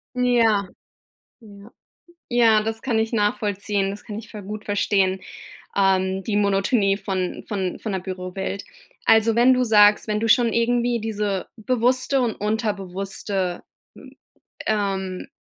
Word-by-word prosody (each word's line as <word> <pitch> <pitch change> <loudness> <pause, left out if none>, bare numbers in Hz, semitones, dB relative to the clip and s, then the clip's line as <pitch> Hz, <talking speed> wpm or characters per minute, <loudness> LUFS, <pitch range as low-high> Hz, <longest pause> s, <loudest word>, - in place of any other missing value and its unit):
Ja. 230 -5 +2 0.7
Ja. 205 0 -15 0.6
Ja, 225 -3 +4
das 225 0 -3
kann 235 -4 0
ich 220 +1 -1
nachvollziehen, 205 -2 0
das 200 +1 -8
kann 210 -1 -7
ich 225 0 -10
ver 210 -2 -8
gut 210 +2 -7
verstehen, 195 -2 +1 0.6
ähm, 190 -1 +1
die 210 -2 -1
Monotonie 200 0 +2
von 190 -3 -3
von 190 -4 -3
von 215 - -5
der 190 - -1
Bürowelt. 185 +1 -5 0.4
Also, 225 0 +4
wenn 245 +2 +6
du 250 - +1
sagst, 210 -1 +5
wenn 210 0 0
du 225 - 0
schon 235 0 +4
irgendwie 240 0 +1
diese 210 -3 -2
bewusste 255 +4 +1
und 230 -3 0
unterbewusste 195 -3 -3 0.3
m - - -14 0.6
ähm, 195 -3 -2
210 Hz, 135 wpm, -23 LUFS, 195-225 Hz, 0.7 s, wenn